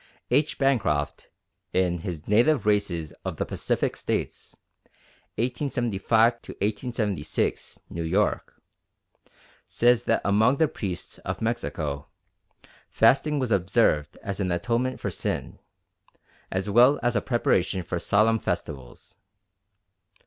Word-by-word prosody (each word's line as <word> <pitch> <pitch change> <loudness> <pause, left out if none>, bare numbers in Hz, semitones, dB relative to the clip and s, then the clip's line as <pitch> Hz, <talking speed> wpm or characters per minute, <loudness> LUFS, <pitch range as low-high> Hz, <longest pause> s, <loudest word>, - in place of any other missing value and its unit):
H. 145 +4 +2
Bancroft, 80 - 0 0.4
in 90 -2 +1
his 80 -2 -6
Native 120 +4 +3
Races 100 -7 0
of - - -4
the - - -1
Pacific - - -1
States - - -4 0.8
(1875 120 -2 +1 0.8
6, - - -2
New 85 - -6
York), 95 +6 -1 1.1
says 120 0 +3
that 115 - +2
among 110 +7 +3
the 160 - +3
priests 95 -10 -6
of - - -5
Mexico 75 -11 -3 0.8
"fasting 135 +6 +3
was 130 -4 -1
observed 95 -6 +2
as 100 -2 -4
an 95 -2 0
atonement 120 +8 -1
for - - -3
sin, - - -4 0.9
as 95 +1 -2
well 120 +7 +5
as 120 0 +1
a 100 - +2
preparation 95 -6 +1
for 90 0 -3
solemn 110 +5 +3
festivals. 75 -10 -5
105 Hz, 110 wpm, -26 LUFS, 90-120 Hz, 1.1 s, well